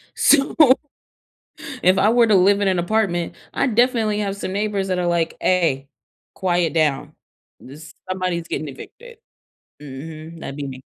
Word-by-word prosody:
So, 275 Hz, -1 st, +3 dB, 1.3 s
if 185 Hz, +2 st, +4 dB
I 215 Hz, -, +4 dB
were 235 Hz, -1 st, +4 dB
to 215 Hz, -, +3 dB
live 200 Hz, +2 st, +4 dB
in 200 Hz, -, +1 dB
an 185 Hz, -2 st, +1 dB
apartment, 175 Hz, -2 st, -1 dB, 0.2 s
I'd 250 Hz, -6 st, 0 dB
definitely 230 Hz, -3 st, +2 dB
have 200 Hz, -1 st, -3 dB
some 190 Hz, -2 st, -5 dB
neighbors 200 Hz, -1 st, -2 dB
that 185 Hz, -1 st, -1 dB
are 175 Hz, -, -1 dB
like, 170 Hz, -1 st, 0 dB
"Ay. 150 Hz, -7 st, +1 dB, 0.5 s
Quiet 175 Hz, -3 st, 0 dB
down. 150 Hz, -4 st, 0 dB, 0.5 s
This" 155 Hz, +5 st, -13 dB, 0.2 s
somebody's 180 Hz, -2 st, -2 dB
getting 155 Hz, -, -3 dB
evicted. 465 Hz, -, -12 dB, 0.6 s
Mhm. 155 Hz, +4 st, -9 dB
That'd 135 Hz, -, -7 dB
be 140 Hz, -1 st, -4 dB
me. 130 Hz, 0 st, -9 dB
180 Hz, 155 wpm, -21 LUFS, 160-210 Hz, 1.3 s, if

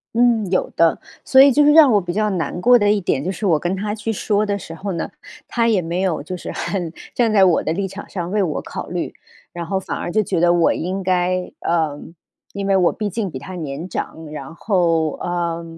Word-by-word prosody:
嗯， 230 Hz, -4 st, +3 dB
有 185 Hz, -, 0 dB
的。 165 Hz, -1 st, +3 dB, 0.2 s
所 265 Hz, -, +4 dB
以 280 Hz, +1 st, +7 dB
就 295 Hz, +4 st, +4 dB
是 295 Hz, -, +6 dB
让 300 Hz, -3 st, +7 dB
我 205 Hz, -, +4 dB
比 175 Hz, -1 st, -4 dB
较 210 Hz, +2 st, +1 dB
难 175 Hz, -1 st, -2 dB
过 245 Hz, +4 st, +6 dB
的 205 Hz, -1 st, +3 dB
一 210 Hz, -, +2 dB
点， 145 Hz, -7 st, -1 dB
就 185 Hz, -, -2 dB
是 195 Hz, +3 st, -5 dB
我 165 Hz, -6 st, +3 dB
跟 175 Hz, +4 st, -1 dB
他 205 Hz, +2 st, -3 dB
去 220 Hz, +1 st, -3 dB
说 210 Hz, 0 st, 0 dB
的 200 Hz, -1 st, -1 dB
时 165 Hz, -, -9 dB
候 195 Hz, +5 st, -5 dB
呢， 170 Hz, -, -3 dB, 0.4 s
他 230 Hz, -1 st, +1 dB
也 215 Hz, -5 st, +3 dB
没 170 Hz, +3 st, -2 dB
有 180 Hz, -6 st, -1 dB
就 180 Hz, +5 st, -5 dB
是 180 Hz, -, -7 dB
很 170 Hz, -1 st, -3 dB, 0.2 s
站 235 Hz, -3 st, +2 dB
在 200 Hz, -3 st, +5 dB
我 175 Hz, -3 st, +3 dB
的 -, -, -1 dB
立 195 Hz, +3 st, -2 dB
场 195 Hz, +2 st, -9 dB
上 175 Hz, -2 st, -4 dB
为 210 Hz, 0 st, +1 dB
我 165 Hz, -6 st, -1 dB
考 -, -, -7 dB
虑， 175 Hz, -1 st, -4 dB, 0.4 s
然 170 Hz, -1 st, -5 dB
后 190 Hz, +2 st, 0 dB
反 -, -, -5 dB
而 -, -, -4 dB
就 215 Hz, +4 st, +2 dB
觉 185 Hz, -3 st, -1 dB
得 175 Hz, +1 st, +4 dB
我 170 Hz, -1 st, +3 dB
应 185 Hz, +3 st, -3 dB
该 180 Hz, 0 st, 0 dB
呃， 160 Hz, -4 st, 0 dB, 0.5 s
因 200 Hz, 0 st, -4 dB
为 195 Hz, -, +3 dB
我 180 Hz, -2 st, +4 dB
毕 210 Hz, -, -3 dB
竟 205 Hz, 0 st, -3 dB
比 135 Hz, -, -6 dB
她 140 Hz, +8 st, -9 dB
年 155 Hz, -1 st, -5 dB
长， 165 Hz, -2 st, -5 dB
然 155 Hz, +1 st, -7 dB
后， 170 Hz, -6 st, +1 dB
呃， 170 Hz, -1 st, -2 dB
185 Hz, 260 characters per minute, -20 LUFS, 170-205 Hz, 0.5 s, 以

